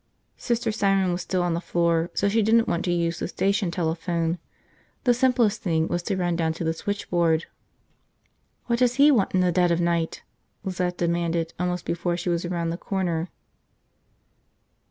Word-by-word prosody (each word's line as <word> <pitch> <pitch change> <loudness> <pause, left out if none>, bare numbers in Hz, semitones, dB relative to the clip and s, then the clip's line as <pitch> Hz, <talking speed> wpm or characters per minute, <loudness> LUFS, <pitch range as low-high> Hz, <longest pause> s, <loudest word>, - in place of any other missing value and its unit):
Sister 235 -2 -1
Simon 195 -3 +2
was 175 +1 -2
still 185 -2 -1
on 175 -1 0
the 170 - -2
floor 170 -1 +1
so - - +1
she 220 +3 +2
didn't 225 +2 +3
want 170 - 0
to 175 - 0
use 170 -1 0
the - - -2
station 195 +1 0
telephone. 170 0 -1 0.6
The 245 - +4
simplest 240 -4 +2
thing 165 -5 0
was 175 - -1
to 190 +2 -2
run 175 -2 0
down 165 -1 0
to 165 - -5
the 160 0 0
switchboard. 170 -4 0 1.2
"What 235 -1 0
does 245 -1 +3
he 285 +2 +6
want 210 -8 +2
in 185 - +4
the 180 -1 +3
dead 175 0 +3
of 170 0 +1
night?" 170 -1 -1 0.4
Lizette 180 -1 -2
demanded 170 -1 -1
almost 180 0 -2
before 175 0 -1
she 175 +1 -3
was 170 0 0
around 170 -1 -2
the 170 - -3
corner. 180 -3 -2
175 Hz, 175 wpm, -25 LUFS, 170-195 Hz, 1.2 s, he